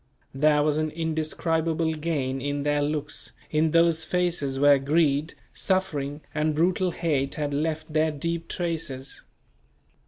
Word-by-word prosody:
There 150 +2 +3
was 150 0 +1
an 155 0 0
indescribable 160 0 0
gain 145 -4 -2
in 145 +1 -2
their 145 0 +1
looks, 150 0 -3 0.2
in 155 +1 +3
those 165 0 +3
faces 170 -6 0
where 145 0 +6
greed, 150 +1 +1 0.2
suffering 155 -7 -1
and 155 0 0
brutal 180 +3 +2
hate 150 -6 -1
had 145 -2 -2
left 155 +1 -2
their 155 +1 +3
deep 165 +3 -3
traces. 155 -6 -4
155 Hz, 130 wpm, -26 LUFS, 145-165 Hz, 0.2 s, where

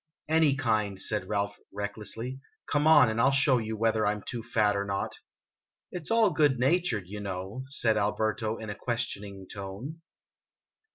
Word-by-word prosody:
"Any 155 -3 +4
kind," 110 -7 0
said 105 +2 0
Ralph, 100 -1 -1
recklessly. 105 +5 -4 0.3
"Come 145 +1 +2
on, 160 -4 +8
and 110 +1 0
I - - +5
'11 135 0 +4
show 135 -1 +4
you 110 -1 -4
whether 110 0 +2
I 105 - +3
'm 105 - -8
too 120 - -5
fat 110 -3 +1
or 100 - 0
not." 100 -1 -3 0.3
" - - -65
It 175 -4 -5
's - - +1
all 225 -3 +4
good 150 -4 +3
natured, 130 - +1
you 105 +3 -7
know?" 100 +5 -5
said 115 -6 +1
Alberto, 110 +2 0
in 110 -1 -6
a - - -6
question 120 -4 -3
ing 100 -2 -9
tone. 100 - -7
110 Hz, 185 wpm, -29 LUFS, 105-135 Hz, 0.3 s, on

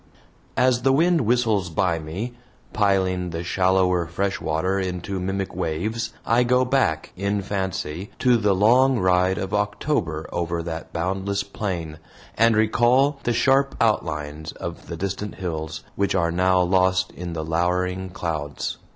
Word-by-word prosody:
As 125 -1 +3
the 135 +2 +3
wind 165 +4 +3
whistles 110 -6 +2
by 85 +1 0
me, 90 +11 -5 0.4
piling 95 -3 +1
the 85 0 -4
shallower 90 -1 +2
fresh 95 +4 -2
water 80 +5 0
into 95 +1 -3
mimic 95 +1 -3
waves, 110 +9 -2
I 115 +2 +3
go 125 +1 +3
back, 125 - 0
in 100 +1 -1
fancy, 95 -3 -3
to 125 -1 +4
the 105 -3 +2
long 125 +6 +4
ride 90 -1 +2
of 95 0 -4
October 105 - -1
over 85 -1 -2
that 80 -1 -6
boundless 95 +3 -1
plain, 90 -6 -4 0.4
and 115 0 +4
recall 125 +6 +3
the 120 - +2
sharp 135 +3 +3
outlines 80 -8 -1
of 85 -1 -7
the 85 - -6
distant 100 +3 -4
hills, 80 -3 -5
which 100 -1 0
are 85 -3 +2
now 90 +1 +3
lost 95 0 +2
in 85 -1 -6
the 80 -1 -4
lowering 90 +3 0
clouds. 80 -5 -4
95 Hz, 145 wpm, -23 LUFS, 85-110 Hz, 0.4 s, to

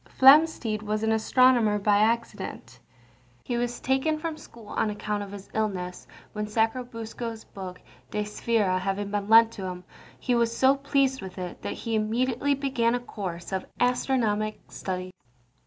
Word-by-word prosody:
Flamsteed 270 -6 +6
was 215 0 -2
an 220 - +2
astronomer 225 -1 +4
by 205 0 +3
accident. 230 +2 -1 0.6
He 245 - -3
was 240 0 -2
taken 265 +4 +1
from 320 0 -4
school 230 -8 -14
on 215 - 0
account 210 0 -3
of 200 -1 -7
his 200 -1 -9
illness, 190 -5 -3 0.3
when 210 0 -3
Sacrobosco's 225 0 -2
book 185 -2 -9 0.3
De 210 - -1
Sphæra 210 -3 0
having 195 +2 -2
been 205 0 -2
lent 225 0 +7
to 195 -4 -7
him, 180 -1 -6 0.4
he 250 - 0
was 235 -1 +1
so 265 +1 +5
pleased 275 -2 +1
with 190 0 -8
it 180 -1 -6
that - - -3
he 230 - -5
immediately 245 +6 +1
began 255 -4 +1
a - - -1
course 190 -8 -6
of 190 -1 -3
astronomic 230 -4 +1
studies. 185 -1 -5
220 Hz, 155 wpm, -27 LUFS, 205-245 Hz, 0.6 s, lent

